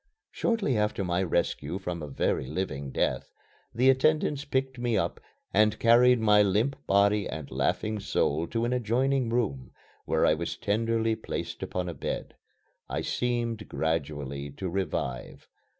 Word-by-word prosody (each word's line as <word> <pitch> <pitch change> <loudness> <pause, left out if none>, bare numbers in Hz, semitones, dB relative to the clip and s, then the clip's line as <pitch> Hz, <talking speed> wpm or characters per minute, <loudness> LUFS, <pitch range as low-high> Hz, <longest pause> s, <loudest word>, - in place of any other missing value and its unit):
Shortly 225 - 0
after 105 -1 0
my 90 0 0
rescue 85 -2 -1
from 90 -3 -4
a 75 - -5
very 65 -1 -1
living 70 -4 -3
death, - - -1 0.4
the 125 +3 +2
attendants 150 +1 +1
picked 130 -2 -1
me 120 -2 +1
up - - -1 0.3
and 105 +1 +4
carried 120 +1 +5
my 105 -1 +5
limp 105 +7 +2
body 100 +1 +3
and 75 -3 -6
laughing 110 0 0
soul 80 -4 0
to 115 +4 -1
an 120 - 0
adjoining 125 +2 +1
room, 90 - -1 0.3
where - - +2
I - - +5
was 85 +2 -3
tenderly 115 +1 +1
placed - - -5
upon 90 -1 -3
a 85 - -3
bed. 70 - -4 0.6
I - - -2
seemed 120 -3 -2
gradually 75 -3 -2
to 95 +5 -4
revive. 85 -9 -3
105 Hz, 150 wpm, -28 LUFS, 85-120 Hz, 0.6 s, carried